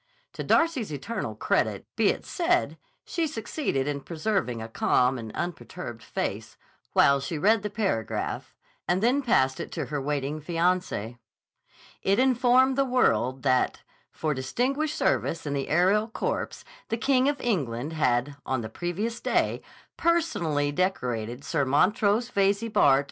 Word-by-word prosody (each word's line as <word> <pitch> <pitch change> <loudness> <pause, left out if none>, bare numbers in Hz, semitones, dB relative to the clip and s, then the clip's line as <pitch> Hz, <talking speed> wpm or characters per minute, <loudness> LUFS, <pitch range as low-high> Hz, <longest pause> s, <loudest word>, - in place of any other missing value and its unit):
To - - -5
Darcy's 320 - +2
eternal 150 - -4
credit - - 0
be - - +3
it - - 0
said, 350 0 0 0.3
she 335 -2 -1
succeeded 225 - -2
in 145 -1 -2
preserving 160 - -2
a 110 - -5
calm 125 +3 +2
and 110 -2 -7
unperturbed 170 -8 -5
face, 115 - -4 0.4
while 140 0 +5
she 160 +4 -4
read 210 +7 +3
the 210 - -3
paragraph, 195 - -2 0.3
and 180 +3 +1
then 255 +5 +3
passed 130 - +2
it - - -5
to - - -3
her 145 -2 -3
waiting 145 +1 -2
fiancé. 165 - -1 0.8
It 195 +1 +2
informed 255 +1 +4
the - - +5
world 135 - +1
that, 130 -2 +1 0.3
for 155 -1 -1
distinguished 255 - -1
service 165 - 0
in 145 - -2
the 140 -1 -2
aerial 190 +7 +3
corps, 225 - -3 0.3
the 225 - 0
King 260 +3 +3
of 290 - -2
England 145 - -1
had, 140 -2 +1
on 130 -2 -1
the 110 - -6
previous 190 - -3
day, - - 0 0.4
personally 170 - +1
decorated 125 - -2
Sir - - 0
Montrose 205 - +2
Veyze, 200 +2 +1
Bart. 135 -1 +5
175 Hz, 145 wpm, -27 LUFS, -, 0.8 s, while